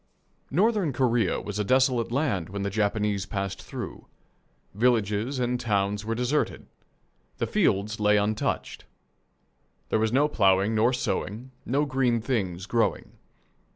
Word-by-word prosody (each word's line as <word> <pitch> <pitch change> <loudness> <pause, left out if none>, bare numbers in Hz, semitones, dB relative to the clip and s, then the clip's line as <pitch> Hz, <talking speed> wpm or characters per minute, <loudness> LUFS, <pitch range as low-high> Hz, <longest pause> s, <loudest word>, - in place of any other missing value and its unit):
Northern 195 - +2
Korea 120 -6 +1
was 105 0 -5
a - - +1
desolate 130 0 +2
land 120 - 0
when 100 +1 -4
the 100 - -2
Japanese 105 -1 0
passed 100 -1 -4
through. - - -8 0.7
Villages 110 +2 +1
and 125 0 0
towns 105 -3 0
were 115 +1 -2
deserted. 125 +5 -1 0.7
The - - 0
fields 105 +3 +1
lay 105 0 +4
untouched. 105 +1 -2 1.0
There - - +2
was 110 0 +1
no 140 +4 +3
ploughing 100 -5 +3
nor 110 +3 +3
sowing, 125 -1 -3 0.2
no 140 +4 +1
green 130 -4 +1
things 95 -7 -2
growing. 115 +2 0
110 Hz, 130 wpm, -26 LUFS, 100-125 Hz, 1.0 s, lay